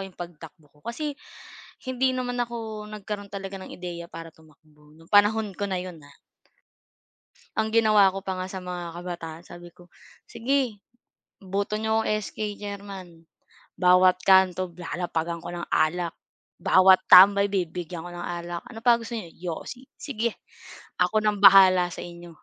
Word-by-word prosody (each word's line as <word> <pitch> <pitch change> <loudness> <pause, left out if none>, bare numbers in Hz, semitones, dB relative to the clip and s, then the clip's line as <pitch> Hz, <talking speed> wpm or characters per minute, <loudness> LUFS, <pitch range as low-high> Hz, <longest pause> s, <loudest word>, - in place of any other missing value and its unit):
yung 190 -2 -11
pagtakbo 165 -3 -10
ko. - - -25
Kasi 290 +5 -4 0.7
hindi 260 0 +1
naman 245 -1 -3
ako 225 -3 -5
nagkaroon 205 -1 -7
talaga 195 0 -6
ng - - -10
ideya 175 -1 -7
para 165 -1 -9
tumakbo 150 -1 -23
'no, 165 - -18
panahon 205 0 +4
ko 205 - -3
na 190 - -2
'yon, 180 -3 -9
ha. 145 - -17 1.5
Ang 220 0 0
ginawa 215 -4 +5
ko 195 - -5
pa 190 -1 -4
nga 185 - -3
sa 190 0 -7
mga 175 -2 -6
kabataan, 170 -2 -7
sabi 175 -1 -13
ko, 175 0 -19 0.4
"Sige, 255 -3 -1 0.6
boto 200 +2 -3
niyo 220 +1 0
akong - - -2 0.2
SK 210 -1 -5
Chairman. 195 -5 -9 0.5
Bawat 180 0 +5
kanto 185 -1 +4
lalapagan 170 -1 -3
ko - - -9
ng 175 0 -5
alak. 170 +2 +1 0.5
Bawat 185 0 +6
tambay 200 +2 +8
bibigyan 175 -3 -4
ko 175 - -8
ng 175 - -8
alak. 175 0 -5
Ano 225 -1 -11
pa 235 -1 +5
gusto 230 +1 -6
niyo, 175 -7 -7 0.2
yosi? 255 0 -10
Sige, 235 -5 -3 0.6
ako 215 +4 +2
nang 210 -1 +1
bahala 185 -2 +7
sa - - -8
inyo. 170 -1 -11
185 Hz, 155 wpm, -25 LUFS, 175-210 Hz, 1.5 s, tambay